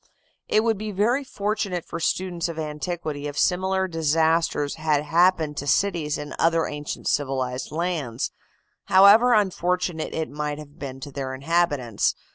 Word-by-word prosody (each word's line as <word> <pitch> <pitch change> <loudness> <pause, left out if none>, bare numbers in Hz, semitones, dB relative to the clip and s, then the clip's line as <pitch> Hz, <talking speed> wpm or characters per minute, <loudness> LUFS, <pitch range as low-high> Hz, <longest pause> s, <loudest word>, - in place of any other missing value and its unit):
It 215 - +3
would 225 -3 +1
be 215 0 -4
very 230 +8 +1
fortunate 205 -7 -2
for - - -6
students 175 0 -1
of 165 - -6
antiquity 155 -1 -4
if 145 0 -7
similar 190 +2 +1
disasters 160 -2 +1
had 155 -2 0
happened 165 -1 +2
to 145 - -4
cities 170 -5 +1
in 150 0 -7
other 165 0 +3
ancient 145 0 -5
civilized 130 -2 -1
lands, 155 -8 -2 0.5
however 205 +6 +7
unfortunate 180 -4 0
it 160 -1 -1
might 150 0 -3
have 150 -1 -12
been 135 -1 -7
to 145 - -7
their 130 -1 -4
inhabitants. 140 -6 0
160 Hz, 145 wpm, -24 LUFS, 145-185 Hz, 0.5 s, however